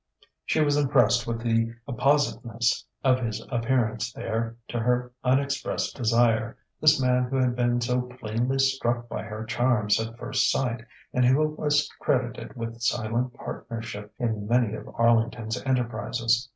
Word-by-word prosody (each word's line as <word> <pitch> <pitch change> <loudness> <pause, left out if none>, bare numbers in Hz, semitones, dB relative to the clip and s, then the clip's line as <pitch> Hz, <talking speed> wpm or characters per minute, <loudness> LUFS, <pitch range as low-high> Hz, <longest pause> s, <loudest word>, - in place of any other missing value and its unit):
She 155 - +1
was 145 -1 +3
impressed 125 -5 +3
with 115 0 -2
the 115 0 +1
appositeness 125 -3 +1 0.2
of 130 -1 +4
his 115 -4 -3
appearance 115 -2 0
there 115 -1 -3
to 120 - -2
her 125 +1 0
unexpressed 140 +2 0
desire, 115 -1 +2 0.2
this 155 -2 +5
man 125 -1 +2
who 130 +2 -4
had 130 -2 +2
been 120 0 +1
so 125 +1 +1 0.2
plainly 120 +4 -1
struck 130 -3 +1
by - - -4
her 110 0 -6
charms 120 -3 +2
at 115 +1 -6
first 125 +1 +1
sight 120 -3 -1 0.3
and 125 - +2
who 130 +5 +4
was 150 -1 +1
credited 125 -1 -1
with 115 -1 -6
silent 120 +1 0
partnership 110 -3 -7
in 110 -4 -2
many 120 -2 +2
of 110 - -7
Arlington's 115 0 +1
enterprises. 120 -1 0
120 Hz, 145 wpm, -26 LUFS, 115-130 Hz, 0.3 s, this